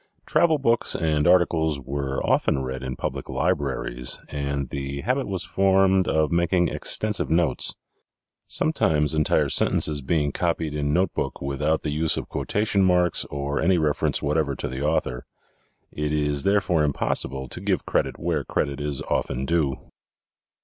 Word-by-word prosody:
Travel 160 -2 +3
books 120 -4 +1
and 75 -2 +1
articles 80 -4 +3
were 70 0 -3
often 65 - +1
read 65 0 -4
in 65 -1 -4
public - - -5
libraries - - -1
and 70 -2 -3
the 70 0 -4
habit 130 - -1
was 95 -3 -3
formed 95 +1 +3
of 80 -2 +1
making 85 +1 +2
extensive 105 -1 0
notes, 80 -5 +1 0.7
sometimes 75 -1 +2
entire 75 -1 +2
sentences 75 -2 +2
being 75 +1 0
copied 80 -2 -1
in 75 -1 -1
notebook 90 +5 -1
without 75 +3 -1
the 75 - -2
use 80 +2 +1
of - - -5
quotation 105 -1 0
marks 90 -2 +2
or 70 0 -3
any 90 +2 +3
reference 75 -3 0
whatever 75 -1 0
to - - -4
the 65 +1 -5
author. 70 -5 -1 0.6
It 75 0 -3
is 75 -1 0
therefore 100 -5 +2
impossible 70 -2 -1
to - - -5
give - - -1
credit - - -1
where - - -1
credit 70 0 -2
is 75 -2 -2
often 65 +2 -2
due. 75 -4 +1
75 Hz, 150 wpm, -24 LUFS, 70-90 Hz, 0.7 s, Travel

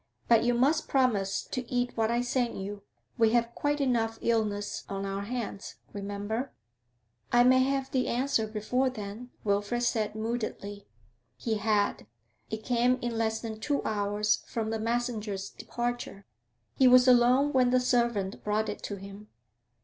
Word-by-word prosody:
But 230 -2 +5
you 240 0 +2
must 290 +7 +2
promise 215 -8 +1
to 255 - -4
cat 245 0 -2
what 225 -1 +1
I 235 +1 +1
send 245 -2 -1
you; 200 +1 -6 0.4
we 225 -1 +4
have 235 0 +2
quite 290 +3 -1
enough 230 -4 +1
illness 210 -3 0
on 195 0 -3
our 195 0 -3
hands, 215 -2 -5 0.2
remember.' 205 +5 -3 0.8
'I 240 - +6
may 255 +1 +6
have 270 0 0
the 255 -1 +1
answer 240 -3 +1
before 230 +5 0
then,' 215 +1 -7
Wilfrid 205 +4 0
said, 215 -3 0
moodily. 215 -3 -4 0.5
He 225 -2 -1
had; 210 - +1 0.4
it 220 0 -5
came 245 +1 +2
in 240 -1 -2
less 220 -1 0
than 220 -2 -6
two 285 +4 -1
hours 210 0 +1
from 220 -1 -2
the 225 - -2
messenger's 220 -4 -2
departure. 240 -4 -4 0.5
He 260 - +5
was 250 0 +7
alone 255 +3 +5
when 255 -2 +4
the 255 +1 +4
servant 235 -6 0
brought 210 +1 0
it - - -5
to 205 - -4
him. 200 +2 -10
230 Hz, 155 wpm, -29 LUFS, 210-250 Hz, 0.8 s, was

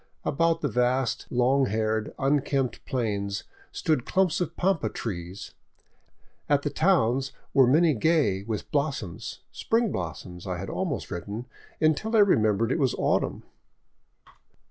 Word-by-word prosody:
About 165 +2 +1
the 145 - +1
vast, 125 0 0
long 130 +2 +3
haired, 110 +1 -1
unkempt 135 -2 0
plains 100 -5 -2 0.3
stood 155 -6 0
clumps 185 0 +1
of 175 - -3
pampa 190 -1 +1
trees; 90 -2 -6 1.0
at 145 -1 +3
the 145 - -1
towns 135 -6 +2 0.2
were 135 -3 +6
many 155 +4 +4
gay 125 - +2
with 105 +1 -5
blossoms 140 - -3
— - - -49
spring 225 -2 0
blossoms, 90 +1 -6
I 90 -1 -2
had 95 +2 -5
almost 175 -9 -3
written, 105 +7 -5 0.3
until 160 +9 +1
I 215 - +7
remembered 110 - +3
it 165 - 0
was 130 -4 +2
autumn. - - 0
130 Hz, 135 wpm, -27 LUFS, 105-155 Hz, 1.0 s, I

